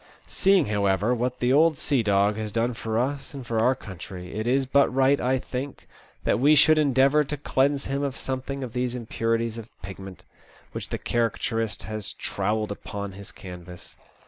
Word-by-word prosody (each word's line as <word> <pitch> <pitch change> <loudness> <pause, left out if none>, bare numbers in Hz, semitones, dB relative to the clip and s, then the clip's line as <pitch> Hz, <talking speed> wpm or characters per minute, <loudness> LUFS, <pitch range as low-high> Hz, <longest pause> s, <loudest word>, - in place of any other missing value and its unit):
Seeing, 195 -5 +3
however, 100 +1 +1
what 125 +1 -2
the 125 +1 +2
old 155 +1 +4
sea 135 -3 +1
dog 100 -1 +2
has 110 -1 -4
done 115 +3 0
for 110 -1 -3
us 135 +3 -2
and 135 -3 -7
for 115 -2 -1
our 125 +4 +3
country, 90 -3 -9
it 110 +2 -3
is 135 +2 +2
but 140 +2 +4
right, 135 +2 +3
I 130 +1 +2
think, 130 +2 -6 0.4
that - - +2
we 145 +4 +6
should 155 +1 +6
endeavour 140 +1 +4
to 150 +1 -4
cleanse 140 0 +1
him 140 +1 -2
of 140 -2 -2
something 135 +1 -4
of 120 -3 -6
these 125 0 -1
impurities 115 -1 -1
of 115 0 -10
pigment, 95 0 -9 0.5
which - - -6
the - - -2
caricaturist 115 -1 -1
has 110 -2 -4
trowelled 105 0 -2
upon 100 0 -5
his 100 +1 -10
canvas. 90 -1 -11
120 Hz, 180 wpm, -25 LUFS, 105-135 Hz, 0.5 s, we